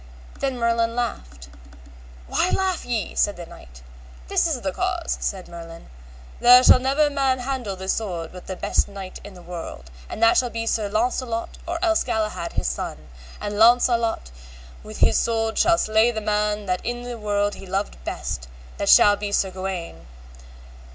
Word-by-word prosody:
Then 270 Hz, -2 st, -1 dB
Merlin 230 Hz, -1 st, +1 dB
laughed. 65 Hz, -, -4 dB, 0.8 s
Why 360 Hz, -, 0 dB
laugh 380 Hz, -2 st, 0 dB
ye? 230 Hz, -4 st, -2 dB
said 205 Hz, -, +1 dB
the 175 Hz, -, -7 dB
knight. 60 Hz, -, -15 dB, 0.5 s
This -, -, +2 dB
is -, -, -2 dB
the -, -, -2 dB
cause, 65 Hz, -, -2 dB
said 60 Hz, 0 st, -3 dB
Merlin: 165 Hz, -1 st, -11 dB, 0.5 s
there 250 Hz, +1 st, +8 dB
shall 255 Hz, -, +8 dB
never 275 Hz, +4 st, +2 dB
man 270 Hz, -2 st, +1 dB
handle 250 Hz, -6 st, -3 dB
this 190 Hz, +1 st, -2 dB
sword 175 Hz, -7 st, -4 dB
but 180 Hz, -, -11 dB
the 190 Hz, -, -4 dB
best -, -, 0 dB
knight 195 Hz, -2 st, -8 dB
of 205 Hz, -2 st, -11 dB
the 180 Hz, -, -13 dB
world, 165 Hz, -, -8 dB, 0.2 s
and 225 Hz, -, -3 dB
that 230 Hz, -, +6 dB
shall 245 Hz, -, +2 dB
be 230 Hz, 0 st, -4 dB
Sir 215 Hz, -2 st, 0 dB
Launcelot 230 Hz, +2 st, -2 dB
or 340 Hz, 0 st, -2 dB
else 330 Hz, -1 st, +2 dB
Galahad 215 Hz, -6 st, -2 dB
his -, -, -2 dB
son, -, -, -4 dB, 0.3 s
and 205 Hz, 0 st, -4 dB
Launcelot 235 Hz, -, +3 dB, 0.5 s
with -, -, -10 dB
this 75 Hz, -, +4 dB
sword 225 Hz, -1 st, 0 dB
shall 340 Hz, -1 st, +4 dB
slay 220 Hz, -1 st, +3 dB
the 225 Hz, -2 st, -2 dB
man 210 Hz, 0 st, -1 dB
that 185 Hz, -1 st, -2 dB
in 240 Hz, +1 st, -3 dB
the 245 Hz, -1 st, -6 dB
world 205 Hz, -1 st, 0 dB
he 195 Hz, -, -10 dB
loved 195 Hz, -, -3 dB
best, -, -, -4 dB, 0.3 s
that -, -, -1 dB
shall 205 Hz, 0 st, +7 dB
be 205 Hz, 0 st, -5 dB
Sir 195 Hz, -1 st, +1 dB
Gawaine. 185 Hz, -, -6 dB
210 Hz, 175 wpm, -23 LUFS, 185-240 Hz, 0.8 s, there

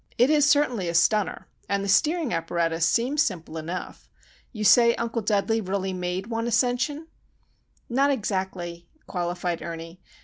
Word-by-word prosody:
It 250 Hz, +5 st, +4 dB
is 295 Hz, -1 st, +4 dB
certainly 250 Hz, -, +2 dB
a 170 Hz, -, -3 dB
stunner; 210 Hz, +4 st, +1 dB, 0.2 s
and 200 Hz, 0 st, 0 dB
the -, -, -3 dB
steering 310 Hz, -, +2 dB
apparatus 165 Hz, 0 st, 0 dB
seems 255 Hz, -, +1 dB
simple 170 Hz, -, -2 dB
enough. 165 Hz, +3 st, -6 dB, 0.4 s
You 215 Hz, -4 st, -5 dB
say 235 Hz, +3 st, +6 dB
Uncle 230 Hz, 0 st, -2 dB
Dudley 215 Hz, +2 st, +1 dB
really 190 Hz, -1 st, -2 dB
made 180 Hz, +1 st, -3 dB
one 230 Hz, +1 st, -3 dB
ascension?" 250 Hz, +6 st, 0 dB, 0.8 s
"Not 270 Hz, +4 st, +2 dB
exactly," 185 Hz, -8 st, -3 dB, 0.2 s
qualified 175 Hz, -1 st, -3 dB
Ernie. 165 Hz, +1 st, -8 dB
200 Hz, 140 wpm, -25 LUFS, 175-240 Hz, 0.8 s, say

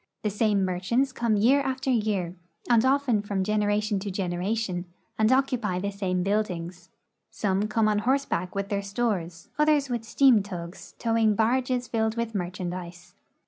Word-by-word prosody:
The 210 Hz, -, 0 dB
same 205 Hz, -2 st, +2 dB
merchants 195 Hz, +9 st, 0 dB
come 235 Hz, -3 st, 0 dB
year 255 Hz, +7 st, +4 dB
after 265 Hz, 0 st, -1 dB
year, 210 Hz, -7 st, 0 dB, 0.3 s
and 235 Hz, -2 st, +4 dB
often 260 Hz, -5 st, +2 dB
from 200 Hz, -2 st, -2 dB
gen 215 Hz, +2 st, 0 dB
eration 205 Hz, -1 st, 0 dB
to 200 Hz, -, -4 dB
generation, 185 Hz, +1 st, -2 dB, 0.3 s
and 220 Hz, +2 st, +4 dB
occupy 255 Hz, -8 st, +1 dB
the 200 Hz, +2 st, -2 dB
same 185 Hz, -3 st, -1 dB
buildings. 180 Hz, -3 st, -2 dB, 0.4 s
Some 200 Hz, 0 st, 0 dB
come 215 Hz, 0 st, +2 dB
on 210 Hz, -1 st, +2 dB
horseback 240 Hz, -7 st, 0 dB
with 200 Hz, 0 st, -2 dB
their 200 Hz, -1 st, -1 dB
stores, 200 Hz, -6 st, -3 dB
others 300 Hz, -2 st, +3 dB
with 240 Hz, -2 st, -2 dB
steam 245 Hz, -1 st, +4 dB
tugs 175 Hz, -3 st, -8 dB
towing 225 Hz, -2 st, +2 dB
barges 245 Hz, +3 st, +1 dB
filled 220 Hz, -1 st, -1 dB
with 235 Hz, -1 st, -2 dB
merchandise. 180 Hz, -1 st, -5 dB
210 Hz, 155 wpm, -26 LUFS, 185-235 Hz, 0.4 s, year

